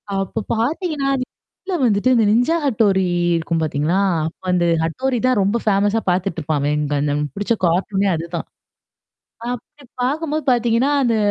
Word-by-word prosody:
அப்போ 195 +3 -2 0.2
பாத்தீங்கன்னா, 290 - -1
அதுக்குள்ள 315 +8 -7
வந்துட்டு 210 +2 +2
இந்த 225 -2 +4
"நிஞ்சா 245 +9 +3
ஹட்டோரி" 205 -7 +2 0.3
இருக்கும் 165 0 -1
பார்த்தீங்களா 155 +4 0 0.5
வந்து 175 -1 +2 0.2
ஹட்டோரி 255 +11 -1
தான் 255 -5 +2
ரொம்ப 200 +4 +1
ஃபேமஸா 205 +1 +2
பாத்துட்டுருப்பான் 170 -5 -1
அவன் 145 +1 +1
அங்க 145 -1 -2
அந்த 145 0 0
அவனுக்கு 145 -2 -3
புடிச்ச 205 +3 0
கார்ட்டூனே 195 +3 +1
அதுதான். 170 +1 -5 1.1
அப்படி 250 +4 -10 0.2
பார்க்கும்போது 305 +4 -1
பாத்தீங்கன்னா, 240 +2 +2
அந்த 235 -3 +2
205 Hz, 140 wpm, -20 LUFS, 170-250 Hz, 1.1 s, இந்த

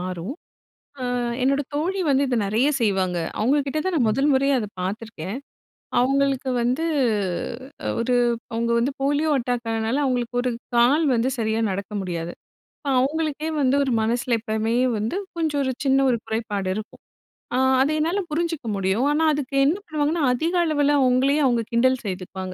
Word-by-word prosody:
மாறும். 185 - -4 0.7
ஆ - - -2 0.4
என்னோட 275 +2 +2
தோழி 360 +6 -1
வந்து 275 0 +3
இதை 245 -2 0
நிறைய 225 +8 +2
செய்வாங்க. 190 -4 +1 0.2
அவுங்கக்கிட்ட 280 +5 +1
தான் 375 - 0
நான் 240 -7 +2
மொதல் 275 +6 +2
முறையா 275 +1 +3
அதை 210 -2 -4
பார்த்துருக்கேன். 200 +1 -5 0.6
அவுங்களுக்கு 270 0 +1
வந்து, 255 +7 0 1.2
ஒரு 250 +2 +1 0.4
அவுங்க 235 +1 -1
வந்து 260 +4 0
போலியோ 290 +3 +1
அட்டாக் 240 -1 -2
ஆனனால, 225 +3 -1
அவுங்களுக்கு 245 -2 -1
ஒரு 250 - 0 0.3
கால் 275 +7 +4
வந்து 240 +2 +1
சரியா 220 0 0
நடக்க 200 +2 -4
முடியாது. 175 -2 -4 0.7
அவுங்களுக்கே 305 +3 -1
வந்து 265 0 +3
ஒரு 260 - -1
மனசில 235 +1 +1
எப்பமே 220 +1 -1 0.2
வந்து 220 - -2 0.2
கொஞ்சம் 310 -4 0
ஒரு 260 - 0
சின்ன 270 0 +3
ஒரு 235 - +1
குறைபாடு 210 -4 -2
இருக்கும். 215 +1 -8 0.5
ஆ, - - +2 0.2
அத 275 - +3
என்னால 335 +6 0
புரிஞ்சுக்க 325 -5 -2
முடியும். 195 +6 0
ஆனா 310 +2 +1
அதுக்கு 280 -1 -3
என்ன 325 +7 +2
பண்ணுவாங்கன்னா, 305 0 0
அதிக 325 +8 -1
அளவில 290 -2 +2
அவுங்களயே 265 +4 +3
அவுங்க 240 -3 +2
கிண்டல் 260 +2 +3
செய்துப்பாங்க. 185 0 -5
255 Hz, 150 wpm, -23 LUFS, 220-285 Hz, 1.2 s, கால்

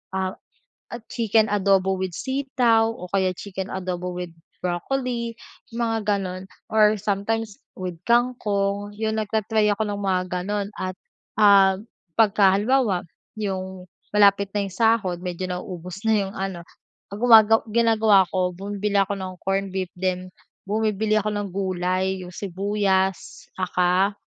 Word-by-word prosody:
ah, 190 0 -2 0.8
chicken 225 -2 +2
adobo 190 -2 +2
with 185 -2 -3
sitaw 255 -4 +1
o 205 -5 -7
kaya 190 -2 +1
chicken 190 -1 -6
adobo 180 -1 -4
with 180 -1 -5 0.3
broccoli, 235 +6 -2 0.4
mga 225 -1 0
gano'n 190 -3 -1 0.3
or 215 -1 +5
sometimes 210 +2 -2 0.2
with, 180 -3 -5
kangkong, 205 -5 +1
'yun 220 0 -1
nagta-try 215 0 +1
ako 205 +1 +1
ng 205 -1 -4
mga 190 -2 +1 0.2
gan'on. 205 +1 -2
At 185 0 -3 0.4
ah, 195 -2 +6 0.4
pagka 200 -3 +5
halimbawa, 215 -3 +1 0.3
'yung 190 -3 -4 0.3
malapit 200 -1 +5
na 205 - +1
'yung 195 - -8
sahod 220 -5 +2
medyo 180 0 -4
nauubos 180 0 -6
na 220 - +4
'yong 195 0 -6
ano, 190 -2 -4 0.5
gumaga 225 0 +6
ginagawa 220 -3 +4
ko 185 -1 0
bumibili 205 +1 -3
ako 195 +1 +2
ng 190 -1 -6
corn 195 +1 -1
beef 190 -1 -2
then 185 0 -2 0.4
bumibili 215 0 0
ako 215 0 -1
ng 205 -1 -2
gulay, 185 0 -1
'yung 180 - -9
sibuyas, 195 0 -1
tsaka, 185 +2 +2
200 Hz, 130 wpm, -23 LUFS, 185-215 Hz, 0.8 s, ah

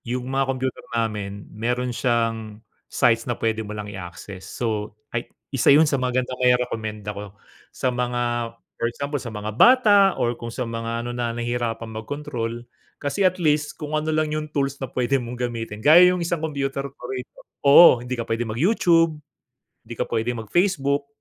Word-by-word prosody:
'Yung 125 +1 -3
mga 135 0 +1
kompyuter 130 -1 -3
namin 105 -3 -3
meron 125 +3 -1
siyang 115 -3 -1 0.3
sites 115 +1 +2
na 120 - -1
pwede 110 -1 -1
mo 105 -1 -7
lang 105 - -5
i 105 - -8
access. 95 +1 -9
So, 105 -3 -3 0.2
ay 120 0 -3 0.2
isa 135 - +3
'yun 150 +3 +7
sa 140 -3 0
magandang 125 0 -1
mairekomenda 110 -4 0
ko 100 0 -9 0.3
sa 130 - -2
mga 120 -1 -1 0.3
for 115 - +2
example, 140 +3 -4
sa 120 - -6
mga 105 -1 -5
bata 245 -5 +7 0.2
or 120 0 +1
kung 120 0 -7
sa 125 +2 -4
mga 115 0 -4
ano, 120 - -4
na 120 -1 -2
nahihirapan 120 -1 -2
mag-control. 120 0 -5 0.3
Kasi 145 +7 -3
at 185 -1 +3
least, 150 -3 0
kung 150 0 -6
ano 155 +1 0
lang 155 -1 0
'yung 155 0 -3
tools 140 -2 -2
na 135 - -3
pwede 130 +1 0
mong 120 +1 -6
gamitin, 115 -3 -4
gaya 175 +4 +8
'yung 180 - -2
isang 170 -2 -1
kompyuter 140 -3 -2
ko 140 - -27
rito. 125 -1 -7 0.2
Oo, 140 -2 +8
hindi 125 +1 -4
ka 115 - -3
pwede 115 +1 -2
mag 110 - -4
YouTube, 165 - +3 0.7
'di 120 - -7
ka - - -1
pwedeng 115 0 -1
mag-Facebook. 140 - +1
125 Hz, 180 wpm, -23 LUFS, 115-140 Hz, 0.7 s, gaya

